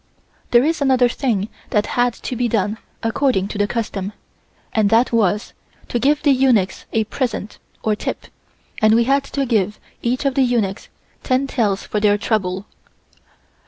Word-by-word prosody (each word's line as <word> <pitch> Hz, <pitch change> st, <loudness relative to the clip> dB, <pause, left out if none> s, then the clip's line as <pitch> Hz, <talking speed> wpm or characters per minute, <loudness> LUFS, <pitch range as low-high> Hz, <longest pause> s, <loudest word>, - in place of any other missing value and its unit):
There 240 Hz, 0 st, +5 dB
is 320 Hz, +1 st, 0 dB
another 260 Hz, -3 st, +4 dB
thing 230 Hz, -5 st, -1 dB, 0.2 s
that 210 Hz, -1 st, +1 dB
had 245 Hz, -1 st, +2 dB
to 255 Hz, -, -5 dB
be 245 Hz, +1 st, 0 dB
done 215 Hz, -1 st, 0 dB, 0.2 s
according 225 Hz, -4 st, +1 dB
to 205 Hz, -, -5 dB
the 205 Hz, -, +2 dB
custom, 205 Hz, -3 st, -3 dB, 0.6 s
and 215 Hz, -2 st, +3 dB
that 230 Hz, +3 st, +3 dB
was 210 Hz, -2 st, +1 dB, 0.4 s
to 240 Hz, -, 0 dB
give 290 Hz, +4 st, +2 dB
the 290 Hz, -, +5 dB
eunuchs 255 Hz, -8 st, +2 dB
a 225 Hz, -, +2 dB
present 225 Hz, -2 st, -4 dB, 0.2 s
or 215 Hz, -1 st, +1 dB
tip, -, -, -4 dB, 0.6 s
and 215 Hz, 0 st, +5 dB
we 235 Hz, -, +4 dB
had 275 Hz, +3 st, +2 dB
to 275 Hz, 0 st, -2 dB
give 210 Hz, -4 st, 0 dB, 0.2 s
each 250 Hz, +4 st, -1 dB
of 275 Hz, -, +2 dB
the 270 Hz, -, +2 dB
eunuchs 230 Hz, -6 st, 0 dB, 0.3 s
ten 260 Hz, +1 st, +1 dB
taels 215 Hz, -8 st, 0 dB
for 210 Hz, -, -2 dB
their 205 Hz, 0 st, +3 dB
trouble. 195 Hz, -3 st, -1 dB
230 Hz, 165 wpm, -20 LUFS, 205-255 Hz, 0.6 s, There